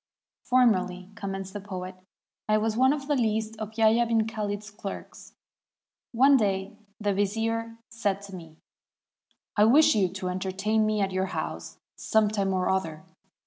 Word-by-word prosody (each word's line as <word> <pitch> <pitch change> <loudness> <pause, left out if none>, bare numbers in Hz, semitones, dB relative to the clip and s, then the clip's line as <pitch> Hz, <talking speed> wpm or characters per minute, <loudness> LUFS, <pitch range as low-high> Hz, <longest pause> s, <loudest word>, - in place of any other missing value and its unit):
"Formerly," 190 -7 +1
commenced 195 -2 -6
the 205 - -4
poet, 185 -2 -6 0.6
"I 215 - +4
was 215 0 0
one 260 +3 +4
of 285 -2 -3
the 295 - +1
least 220 -2 0
of 215 0 -7
Yahya 225 +1 +4
'bn 225 -1 +1
Khalid's 210 -1 -4
clerks. 200 -1 -9 0.8
One 270 +4 +5
day 200 -2 -1 0.2
the 205 -2 0
vizier 225 +3 -1
said 210 -4 -1
to 195 -1 -9
me, 165 -3 -12 1.0
'I 210 - +6
wish 285 +8 +6
you 195 -4 +2
to 180 +1 -4
entertain 195 +4 0
me 215 -1 0
at 195 -1 0
your 185 +1 -1
house - - -5 0.2
some 220 -1 +2
time 200 -2 -1
or 185 -1 0
other.' 165 -5 -1
210 Hz, 155 wpm, -27 LUFS, 190-225 Hz, 1.0 s, I